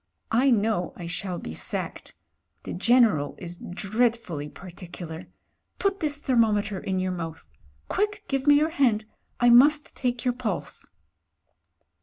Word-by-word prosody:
I 250 +5 +4
know 215 -6 +1
I 175 - -8
shall 180 +1 -4
be 80 - -7
sacked. - - -4 0.5
The - - -5
General 210 - +3
is 175 -1 -6
dreadfully 200 -6 -1
particu 180 0 -10
lar. 160 +2 -8 0.5
Put 395 0 0
this 295 -2 -1
thermometer 215 -7 +1
in 190 0 -2
your 185 0 -1
mouth. 165 -2 -6 0.4
Quick, 415 +1 -1
give 270 0 -2
me 290 - +8
your 310 +2 +3
hand 235 -8 +2 0.2
— - - -43
I 240 0 +5
must 290 +5 +5
take 245 0 -2
your 250 - +2
pulse." 245 -3 -4
220 Hz, 145 wpm, -26 LUFS, 180-260 Hz, 0.5 s, me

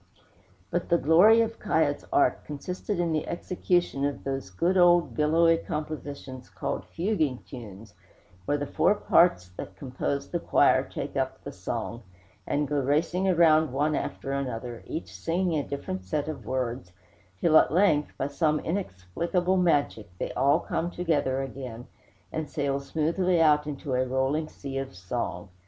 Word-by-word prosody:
But 175 0 -2
the 170 - +5
glory 180 +10 +6
of 225 0 -2
'Kiah's - - 0
art 345 0 +2
consisted 180 +6 -4
in 170 -1 +1
the 155 -1 -1
execution 175 -4 -1
of 140 0 -2
those 135 -7 -3
good 170 - 0
old 175 -6 +5
billowy 165 +5 +4
compositions 145 -5 -6
called - - -4
fuguing 165 - -1
tunes, 110 -5 -10 0.5
where 145 - +1
the 145 - -3
four 205 - +2
parts 170 - +3
that 95 - -7
compose 130 +5 -3
the 175 - 0
choir - - +4
take - - -6
up - - -2
the - - -6
song, 115 +1 -5 0.5
and 145 0 0
go 145 0 0
racing 160 +7 +1
around 160 -4 +4
one 145 +4 +1
after 135 - -4
another, 125 -3 -4
each 160 - -5
singing 170 -1 0
a 145 - -4
different 95 -9 -4
set 145 +12 -2
of 135 -9 -6
words, 125 -6 -3 0.5
till, 165 -2 +3
at - - +2
length, 160 -4 +2
by 135 - -1
some 150 +2 +1
inexplicable 175 - -1
magic, 145 - +1
they - - -3
all 140 +5 +3
come 170 - -2
together 145 -7 0
again, 125 -3 -7 0.5
and 155 -2 -4
sail 140 -3 -1
smoothly 165 +5 0
out 150 -2 +4
into 145 -1 -4
a 125 0 +2
rolling 135 +4 0
sea 135 -3 -6
of 135 -8 -6
song. 90 -1 -4
150 Hz, 155 wpm, -27 LUFS, 130-170 Hz, 0.5 s, glory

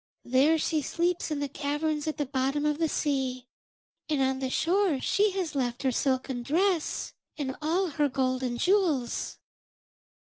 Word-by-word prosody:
There 270 +6 +4
she 315 0 0
sleeps 340 +4 -1
in 300 -2 -2
the 285 - 0
caverns 295 +2 -2
at 310 - -2
the 290 - 0
bottom 275 +2 0
of 300 0 +1
the 325 -1 +1
sea, 265 -5 -1 0.6
and 300 -2 +1
on 265 0 +1
the 265 -1 -2
shore 350 0 +2
she 410 +9 +2
has 370 -5 -2
left 250 -2 -2
her 265 - +2
silken 260 0 0
dress 340 +5 0 0.2
and 270 -3 -3
all 335 +5 +1
her 295 0 +1
gold 255 -1 0
and 240 -2 -2
jewels.' 345 - +1
290 Hz, 165 wpm, -28 LUFS, 260-320 Hz, 0.6 s, There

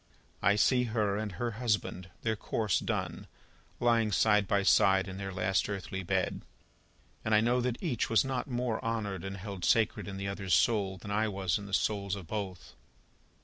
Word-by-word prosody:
I 100 +1 +4
see 125 +4 +3
her 110 -3 0
and 105 -1 -3
her 115 +6 -2
husband, 105 -6 -1
their 110 -1 +1
course 105 -1 0
done, - - -3 0.5
lying 115 -2 +3
side 105 -1 +3
by 100 +1 +2
side 95 0 +4
in 95 0 -6
their 95 -1 -4
last 95 +2 0
earthly 95 -1 -4
bed, 90 - -1 0.8
and 110 0 +2
I - - +6
know 120 +3 +2
that 120 -1 -1
each 135 -10 -1
was 115 +3 +4
not 135 0 -2
more 120 -2 -1
honoured 105 -5 -2
and 95 0 -5
held 100 -2 -7
sacred 110 -3 +2
in 95 -1 -5
the 100 0 -4
other's 95 -3 0
soul, 95 +1 +2
than 100 +2 -8
I 110 +2 +1
was 95 -4 -1
in 100 - -8
the - - -10
souls 100 -3 0
of 95 -3 -8
both. 95 -2 -5
100 Hz, 190 wpm, -31 LUFS, 95-115 Hz, 0.8 s, I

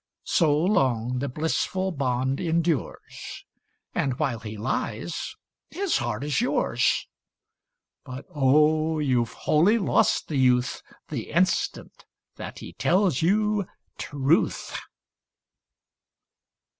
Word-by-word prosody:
So 150 -4 +3
long 130 - +1
the 140 +2 -2
blissful 160 +6 -1
bond 130 -3 -1
endures. 165 -5 -2 0.5
And 130 -2 -1
while 135 -7 -1
he 110 -1 -7
lies, 110 +7 -3 0.3
his 390 -1 0
heart 120 -1 -3
is 150 +7 0
yours: 245 - +1 1.0
But, 130 0 -8
oh 155 +3 +3
I - - 0
youVe 120 -4 +1
wholly 180 +9 +3
lost 205 - +2
the 150 - -2
youth 125 -1 +2 0.3
The - - -5
instant 185 +3 0 0.3
that - - -7
he - - -9
tells 185 -6 +2
you 210 +2 +2 0.3
truth. 145 +3 0
150 Hz, 105 wpm, -25 LUFS, 125-175 Hz, 1.0 s, So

